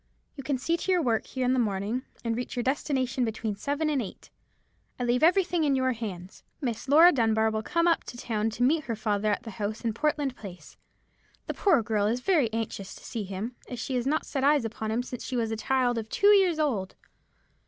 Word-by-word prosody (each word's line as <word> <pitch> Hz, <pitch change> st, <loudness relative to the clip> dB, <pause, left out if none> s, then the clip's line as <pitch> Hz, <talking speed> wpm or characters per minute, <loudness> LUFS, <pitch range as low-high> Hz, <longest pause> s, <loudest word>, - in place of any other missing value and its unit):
You 280 Hz, -, -6 dB
can 280 Hz, -1 st, -1 dB
see 330 Hz, +7 st, 0 dB
to 375 Hz, -, -2 dB
your 360 Hz, -2 st, +3 dB
work 230 Hz, -3 st, 0 dB
here 260 Hz, -1 st, -2 dB
in 250 Hz, -, +3 dB
the 260 Hz, -, +2 dB
morning, 210 Hz, +2 st, -1 dB, 0.2 s
and 230 Hz, -1 st, 0 dB
reach 245 Hz, +2 st, -4 dB
your 245 Hz, -, -1 dB
destination 260 Hz, -2 st, 0 dB
between 220 Hz, -2 st, -2 dB
seven 285 Hz, +8 st, -2 dB
and 290 Hz, -4 st, +1 dB
eight. 200 Hz, -, -9 dB, 0.7 s
I -, -, -1 dB
leave 245 Hz, +1 st, +1 dB
everything 350 Hz, 0 st, +3 dB
in 285 Hz, -2 st, +2 dB
your 260 Hz, 0 st, +2 dB
hands. 200 Hz, -6 st, -7 dB, 0.2 s
Miss 240 Hz, -2 st, -3 dB
Laura 325 Hz, +5 st, +8 dB
Dunbar 220 Hz, -4 st, +2 dB
will 220 Hz, 0 st, -1 dB
come 335 Hz, +8 st, +1 dB
up 335 Hz, -, +2 dB
to 240 Hz, -, -8 dB
town 225 Hz, -2 st, -1 dB
to 245 Hz, -, 0 dB
meet 305 Hz, +4 st, +2 dB
her 230 Hz, -, -2 dB
father 210 Hz, -1 st, 0 dB
at 205 Hz, -, -1 dB
the 225 Hz, -, -7 dB
house 210 Hz, +2 st, -4 dB
in 230 Hz, -2 st, -1 dB
Portland 290 Hz, +1 st, 0 dB
Place. 180 Hz, -8 st, -11 dB, 0.7 s
The -, -, -3 dB
poor 335 Hz, -, +3 dB
girl 210 Hz, -2 st, +1 dB
is 235 Hz, +3 st, 0 dB
very 275 Hz, -, +2 dB
anxious 220 Hz, -3 st, -4 dB
to -, -, -14 dB
see 220 Hz, -4 st, -4 dB
him, 200 Hz, +6 st, -5 dB
as 245 Hz, -, -5 dB
she 250 Hz, +3 st, -4 dB
has 250 Hz, 0 st, 0 dB
not 310 Hz, +3 st, 0 dB
set 270 Hz, -2 st, -3 dB
eyes 285 Hz, -3 st, +4 dB
upon 220 Hz, -1 st, -4 dB
him 230 Hz, +3 st, 0 dB
since 250 Hz, -1 st, -7 dB
she 255 Hz, -, -4 dB
was 225 Hz, -1 st, 0 dB
a -, -, -1 dB
child 245 Hz, +1 st, +1 dB
of 220 Hz, -1 st, -7 dB
two 405 Hz, -, +3 dB
years 375 Hz, -5 st, +4 dB
old. 230 Hz, -12 st, -1 dB
245 Hz, 230 wpm, -27 LUFS, 220-285 Hz, 0.7 s, Laura